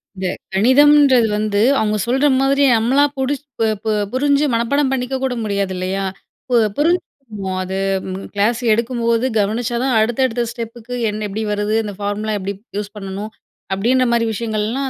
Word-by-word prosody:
இந்த 185 0 -3 0.3
கணிதம்ன்றது 260 +2 +5
வந்து 210 -1 0 0.2
அவங்க 215 -1 0
சொல்ற 265 +4 +2 0.2
மாதிரி 275 +1 +3
நம்மளா 260 +6 +3
புடிச் 280 +2 -2
ப - - +2 0.2
ப - - -3 0.2
புரிஞ்சு 285 +3 +2
மனப்பாடம் 265 +4 +1
பண்ணிக்க 265 0 -2
கூட 260 -1 0
முடியாதுலையா? 195 -2 -2 0.5
பு 245 - +2 0.2
புரிஞ்சுக்கணும். 255 - -2
அது 190 +1 -4 0.6
கிளாஸ் 225 +4 +1
எடுக்கும் 235 +1 -1
போது 230 +2 +2
கவனிச்சாதான் 235 +4 0
அடுத்தடுத்த 240 +1 +1
ஸ்டெப்புக்கு 235 +1 -7
எண் 210 +1 -4
எப்டி 215 +3 -4
வருது? 210 +1 -1
அந்த 205 -1 -5
பார்முலா 210 +1 -2
எப்டி 195 +1 -4 0.3
யூஸ் 205 0 -6
பண்ணனும்? 200 +2 -6 0.4
அப்டின்ற 250 +6 +2
மாரி 230 -1 +2
விஷயங்கள்லாம் 225 +5 -2
230 Hz, 140 wpm, -19 LUFS, 210-260 Hz, 0.6 s, கணிதம்ன்றது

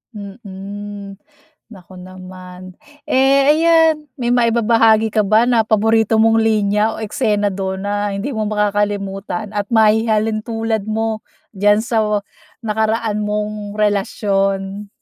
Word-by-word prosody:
Mm. 200 0 -9 0.5
Naku 185 -4 -14
naman. 185 0 -11 0.3
Eh 275 +2 +3
ayan, 320 -1 +3
may 240 -2 -2
maibabahagi 225 -2 +3
ka 215 - 0
ba 215 +3 +4
na 235 -3 +1
paborito 225 +1 +2
mong 225 +1 +3
linya 215 -1 +1
o 220 - -6
eksena 210 -4 0
dun 190 0 -4
na 205 0 -2
hindi 225 +9 -4
mo 220 -3 -2
makakalimutan 205 0 -2
at 205 -1 -3
mahihalintulad 220 0 0
mo 220 0 -2 0.3
diyan 205 +1 +2
sa 235 -2 0
wa-nakaraan 215 +1 -2
mong 210 0 -4
relasyon? 200 -1 -1
210 Hz, 110 wpm, -17 LUFS, 200-225 Hz, 0.5 s, ba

